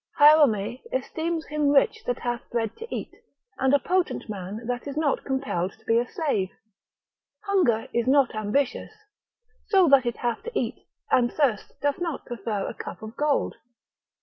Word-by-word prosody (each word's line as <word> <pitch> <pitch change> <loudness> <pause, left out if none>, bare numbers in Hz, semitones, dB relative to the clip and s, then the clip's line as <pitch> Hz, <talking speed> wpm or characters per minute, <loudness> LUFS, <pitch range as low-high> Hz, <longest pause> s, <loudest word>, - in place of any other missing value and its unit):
S. - - -25
Hierome 275 -7 +5
esteems 335 -9 -2
him 300 -1 0
rich 280 -1 +3
that 245 - 0
hath 240 -1 -4
bread 225 -2 -2
to 460 - -7
eat, - - -5 0.5
and 265 0 +3
a 285 - +6
potent 365 +4 -1
man 205 +2 -6
that 245 +3 -3
is 285 +1 -5
not 305 -3 +1
compelled 265 -10 -2
to 220 - -25
be 225 +1 +3
a 245 - -1
slave; 220 - -1 0.9
hunger 345 - +2
is 235 0 0
not 275 -1 +4
ambitious, 220 - -1 0.7
so 385 -4 +5
that 270 -3 +6
it 240 - -2
have 240 -1 -2
to 475 +1 -3
eat, - - -4 0.2
and 240 -2 +4
thirst 255 -9 0
doth 285 +2 +1
not 335 -5 -3
prefer 215 -3 -3
a - - -4
cup - - -8
of 220 +2 -8
gold. 295 0 0
260 Hz, 175 wpm, -26 LUFS, 225-300 Hz, 0.9 s, a